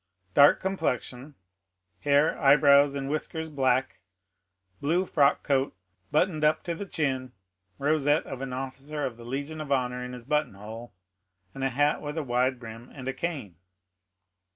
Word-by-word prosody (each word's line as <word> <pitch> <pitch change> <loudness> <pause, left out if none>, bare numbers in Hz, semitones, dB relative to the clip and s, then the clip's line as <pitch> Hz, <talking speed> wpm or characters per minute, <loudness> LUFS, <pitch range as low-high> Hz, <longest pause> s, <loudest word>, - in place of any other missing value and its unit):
"Dark 145 0 +7
complexion; 145 -7 -3 0.6
hair, 145 +2 +3
eyebrows, 140 -1 +6
and 135 -1 -3
whiskers 160 +2 -3
black; 130 -6 +1 0.8
blue 170 +6 +1
frock 145 -5 +3
coat, 135 -6 0 0.3
buttoned 155 +1 +1
up 150 +1 +3
to 170 - -2
the 195 +4 -6
chin; 130 -7 -2 0.4
rosette 145 +1 +2
of 135 -1 -7
an 135 -1 -4
officer 135 +3 -4
of 125 -3 -4
the 120 - -11
Legion 145 +5 -4
of 145 -2 -7
Honor 125 -2 0
in 125 0 -6
his 125 -2 -9
button 150 -6 0
hole; 110 +4 -9 0.6
a 135 0 -1
hat 145 +3 +1
with 150 +1 -5
wide 130 -3 +1
brim, 115 +1 -10
and 130 -2 -9
a 135 - -1
cane." 135 - -4
140 Hz, 150 wpm, -27 LUFS, 130-150 Hz, 0.8 s, Dark